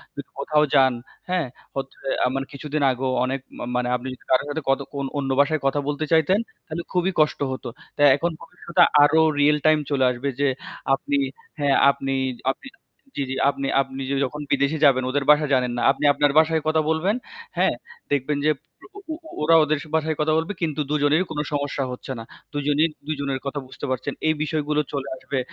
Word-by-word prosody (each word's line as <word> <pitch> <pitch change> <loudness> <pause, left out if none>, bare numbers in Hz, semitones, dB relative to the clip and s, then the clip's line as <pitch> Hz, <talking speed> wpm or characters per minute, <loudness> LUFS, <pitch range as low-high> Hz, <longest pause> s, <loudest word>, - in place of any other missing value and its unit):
যদি 140 - -8
কোথাও 150 +1 +2
যান 130 -1 +5 0.4
হ্যাঁ? 180 -5 0 0.3
হচ্ছে 135 0 -5 0.3
আ - - +4
মানে 135 0 -2
কিছুদিন 150 +1 -3
আগেও 130 +1 -2
অনেক 135 +1 -2 0.2
মা - - -4
মানে 125 0 0
আপনি 125 +1 -5
যদি - - -15
কারো 130 - +4
সাথে 160 +2 -3
কত 135 0 +3 0.4
অন্য 135 -1 -2
ভাষায় 150 +1 +3
কথা 145 - +1
বলতে 150 +1 -1
চাইতেন, 165 +5 +4 0.3
তাইলে 160 +2 -4
খুবই 180 +1 +1
কষ্ট 155 0 +2
হত। 130 - -6 0.3
তা - - -2
এখন 170 +4 -1
ভবিষ্যতে 170 +1 +1 0.2
আরো 160 +2 +5 0.2
রিয়েল 150 +1 +5
টাইম 155 0 +5
চলে 135 -2 +2
আসবে 125 +3 -3
যে 145 - +3 0.5
আপনি 285 - -2 0.4
হ্যাঁ 140 -1 +3 0.2
আপনি 135 0 -3 0.4
আপনি 275 - -11 0.5
জি, - - -2
জি 135 - -2
আপনি 140 0 -3
আপনি 135 0 -6
য - - 0
যখন 150 +3 -6
বিদেশে 140 +3 +2
যাবেন 130 -2 +4
ওদের 140 +1 0
ভাষা 150 0 +4
জানেন 125 -2 +2
না। - - -1
আপনি 140 - -5
আপনার 145 -1 +2
ভাষায় 160 0 +2
কথা 155 0 +3
বলবেন, 165 +7 +1 0.4
হ্যাঁ? - - +3 0.4
দেখবেন 145 +1 0
যে 155 - +5 0.5
ও - - -7
ও - - -4 0.3
ওরা 165 +2 +5
ওদের 150 0 0 0.2
ভাষায় 160 -1 0
কথা 155 +1 +2
বলবে 165 +5 -1
কিন্তু 155 -3 -1
২ 150 - +1
জনের 155 +5 +3
কোন 150 - -3
সমস্যা 145 -1 -1
হচ্ছে 125 - -7
না। 115 - -6 0.3
২ - - -3
জনেই 150 +3 +3 0.2
২ - - -1
জনের 140 -1 -2
কথা 145 +1 -3
বুঝতে 130 - -7
পারছেন, 130 -1 -2
এই 155 - +4
বিষয়গুলো 150 -1 0
চলে 140 -1 -3
আসবে। 130 +1 -3
145 Hz, 195 wpm, -23 LUFS, 135-155 Hz, 0.5 s, যান